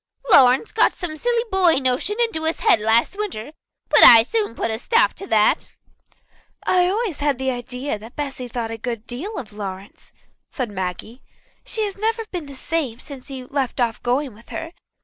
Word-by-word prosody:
Lawrence 260 - +6
got 440 - +3
some 355 -5 -5
silly 470 +8 0
boy 370 -3 +4
notion 265 - 0
into 450 -10 0
his 320 - -1
head - - +4
last 225 - +2
winter, 295 - -4 0.4
but - - +6
I 225 -1 +10
soon 425 - -2
put 230 - -2
a 220 - -3
stop 465 - +2
to 390 - -9
that." 215 -6 +2 0.9
"I 360 -1 +3
always 400 -4 -2
had 285 -3 0
an 265 0 0
idea 250 -1 -4
that 225 +3 -13
Bessy 270 -4 -5
thought 230 -1 -4
a 225 - -6
good 230 -1 -5
deal 320 - -5
of 215 -4 -7
Lawrence," 195 -1 -8 0.4
said 255 -7 -4
Maggie. 190 +6 -5 0.4
"She 440 - -2
has 405 -1 -4
never 450 +2 -1
been 345 -5 -5
the 280 - -10
same 265 -5 -3
since 270 -1 -11
he 265 -2 -8
left 265 -1 -3
off 235 -2 0
going 255 +1 -1
with 225 +3 -19
her. 325 0 -6
265 Hz, 190 wpm, -21 LUFS, 230-360 Hz, 0.9 s, I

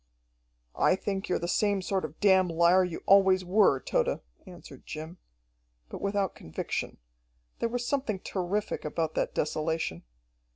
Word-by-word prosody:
"I - - +4
think 195 0 -4
you're - - +2
the 170 - -4
same 200 +1 +1
sort 190 -2 -1
of 155 +1 -10
damn 190 -2 +5
liar 170 +2 +4
you 180 -2 -5
always 190 -1 +5
were, 185 -7 +4
Tode," - - 0 0.3
answered 175 -7 -12
Jim 160 +3 -7 0.7
but - - -8
without 200 -1 0
conviction. 80 - -5 0.6
There 230 - 0
was 245 +1 -3
something 250 -5 -1
terrific 195 +3 -3
about 160 +1 -2
that - - -2
desolation. 155 - -1
185 Hz, 140 wpm, -28 LUFS, 165-200 Hz, 0.7 s, damn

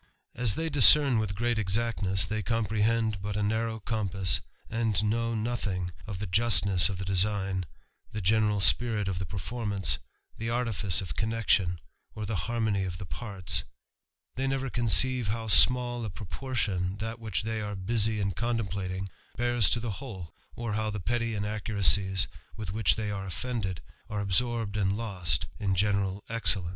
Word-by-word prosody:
As 115 -4 0
they 165 - -2
discern 140 -3 +8
with 105 -3 -2
great 120 +1 0
exactness, 95 -2 +1
they 110 +2 -2
comprehend 110 -1 0
but 105 +1 -3
a 105 - 0
narrow 110 +1 -1
compass, 100 -4 0 0.3
and 110 -2 0
know 115 +2 0
nothing 105 -6 -2 0.2
of 100 -3 -5
the 105 - -4
justness 100 -2 +3
of 100 - -4
the 95 - -5
design, 95 -1 0 0.4
the 105 - -4
general 105 +1 +2
spirit 105 +3 +3
of 90 -3 -2
the 95 - -4
performance, 100 +2 -2 0.4
the 115 +1 -4
artifice 110 -7 0
>f 85 -5 -6
connection, 105 -4 +1 0.4
or 110 - -4
the 110 +1 -2
harmony 110 -4 0
of 90 -1 -4
the 95 - -7
parts; 90 - -1 0.7
they 135 +1 -2
never 135 -1 -1
:onceive 125 0 +2
how 110 +2 -2
small 120 +2 +4
a 110 - -3
proportion 100 -2 -3
that 115 +2 -5
which 110 -6 -2
they 110 0 -2
are 105 -1 -4
busy 110 +2 +1
in 100 -1 0
contemplating 95 -3 -2 0.3
bears 120 -3 +3
to 120 - +1
the 115 -1 -3
whole, 95 -11 -8 0.2
or 115 -2 -3
how 110 0 -1
the 105 -1 -4
petty 115 +3 -1
inaccuracies 100 -2 +1 0.3
with 105 -5 -5
which 110 +1 +2
they 105 -1 -3
are 100 -1 -4
oflfended, 95 0 -3 0.3
are 105 - -3
absorbed 110 +2 0
u)d 100 -2 +1
lost 100 -6 -1
in 95 -2 0
general 100 0 0
excellence. 105 -6 +2
105 Hz, 160 wpm, -29 LUFS, 95-115 Hz, 0.7 s, discern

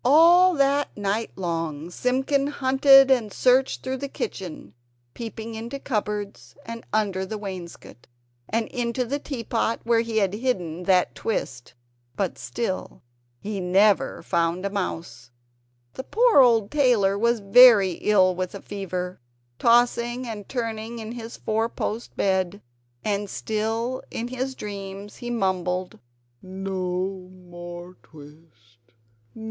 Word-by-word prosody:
All 340 +7 +6
that 280 -2 +1
night 205 +2 -1
long 165 -3 -3
Simpkin 265 +5 0
hunted 270 -1 +5
and 235 -5 +2
searched 255 +5 +2
through 260 0 -3
the 280 - -4
kitchen, 185 - -6 0.4
peeping 225 -1 -7
into 230 +4 -6
cupboards 210 -5 -4
and 230 0 -7
under 200 -3 0
the 215 +3 -5
wainscot, 180 - -9 0.4
and 225 +1 0
into 245 +1 -2
the 280 +5 -2
tea 270 -5 -6
pot 225 0 -1
where 230 0 +3
he 230 -1 -2
had 195 -3 +2
hidden 180 -8 -2
that 185 -1 +3
twist; 125 - -4 0.4
but 195 -3 -2
still 195 -11 -4 0.4
he 205 -1 -4
found 180 -1 -4
never 200 +1 +3
a 170 +2 0
mouse! 165 - -5 0.6
The 260 - -6
poor 465 - +4
old 230 -5 +4
tailor 245 -9 +3
was 235 +3 +1
very 205 -1 +7
ill 190 -3 +4
with 185 +1 -4
a 200 - -8
fever, 185 -2 -5 0.4
tossing 240 +1 +2
and 215 -4 -7
turning 230 -2 -4
in 220 -1 -6
his 235 -1 -8
four 225 +1 -1
post 225 +1 -5
bed; 190 0 0 0.5
and 205 -1 -1
still 225 +5 -2
in 235 +1 -4
his 260 +1 -3
dreams 200 -1 -7
he 240 - -6
mumbled: 185 -4 -1 0.4
"No 185 0 -4
more 175 0 -10
twist! 145 -7 -18
210 Hz, 130 wpm, -24 LUFS, 185-240 Hz, 0.6 s, very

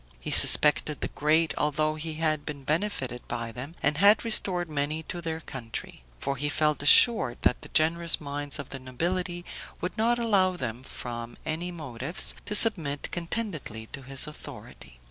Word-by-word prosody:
He - - -4
suspected 150 0 +7
the - - -3
great, 155 +2 0
although 155 +1 0
he 155 0 -6
had 155 -2 -1
been 140 -2 -8
benefited 145 - -3
by 115 -1 -5
them, 130 +8 -9
and 145 +2 0
had 205 +4 +5
restored 185 -6 +1
many 150 +1 -3
to 175 +2 -7
their 160 -1 -4
country; 115 - -8
for 140 - -4
he 145 +3 -2
felt 150 -1 0
assured 145 - +5
that - - +1
the - - -11
generous 165 +1 +1
minds 145 -2 -4
of 140 - -8
the 135 - -8
nobility 175 +7 -4 0.3
would 180 - -5
not 235 +2 +2
allow 200 -6 +1
them, 120 -3 -5
from 120 -2 -7
any 160 +3 -4
motives, 150 -1 -3
to 210 - -1
submit 165 -11 +5
contentedly 170 - -5
to 135 - -8
his 135 +1 -3
authority. 150 - -11
155 Hz, 165 wpm, -26 LUFS, 135-175 Hz, 0.3 s, suspected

